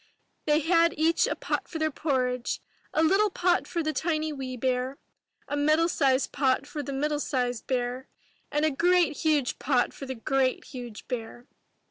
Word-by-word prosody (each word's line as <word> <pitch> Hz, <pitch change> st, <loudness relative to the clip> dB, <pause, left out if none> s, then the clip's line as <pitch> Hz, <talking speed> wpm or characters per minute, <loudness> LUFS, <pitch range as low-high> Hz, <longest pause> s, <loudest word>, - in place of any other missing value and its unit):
They 300 Hz, +1 st, +4 dB
had 335 Hz, +1 st, +3 dB
each 325 Hz, +2 st, +3 dB
a -, -, -1 dB
pot -, -, -2 dB
for 325 Hz, -, -5 dB
their 315 Hz, 0 st, 0 dB
porridge, 255 Hz, -4 st, -1 dB, 0.2 s
— -, -, -36 dB
a 315 Hz, -, +2 dB
little 390 Hz, +6 st, +4 dB
pot 360 Hz, -1 st, +1 dB
for 340 Hz, -2 st, -2 dB
the 310 Hz, 0 st, -1 dB
tiny 310 Hz, -2 st, -1 dB
wee 260 Hz, -2 st, -5 dB
bear, 255 Hz, +2 st, -1 dB, 0.5 s
a 290 Hz, -, -2 dB
middle 305 Hz, +3 st, +3 dB
sized 275 Hz, -5 st, +2 dB
pot 265 Hz, 0 st, +1 dB
for 295 Hz, 0 st, -5 dB
the 285 Hz, -, -5 dB
middle 295 Hz, +2 st, 0 dB
sized 250 Hz, -5 st, -2 dB
bear, 250 Hz, +1 st, -2 dB, 0.4 s
and 295 Hz, +1 st, +1 dB
a 310 Hz, -, +2 dB
great 345 Hz, 0 st, +3 dB
huge 300 Hz, -5 st, +1 dB
pot 255 Hz, -2 st, +1 dB
for 275 Hz, -, -8 dB
the 260 Hz, -, -4 dB
great 260 Hz, +2 st, 0 dB
huge 245 Hz, -5 st, -9 dB
bear. 240 Hz, 0 st, -5 dB
290 Hz, 180 wpm, -27 LUFS, 255-315 Hz, 0.5 s, They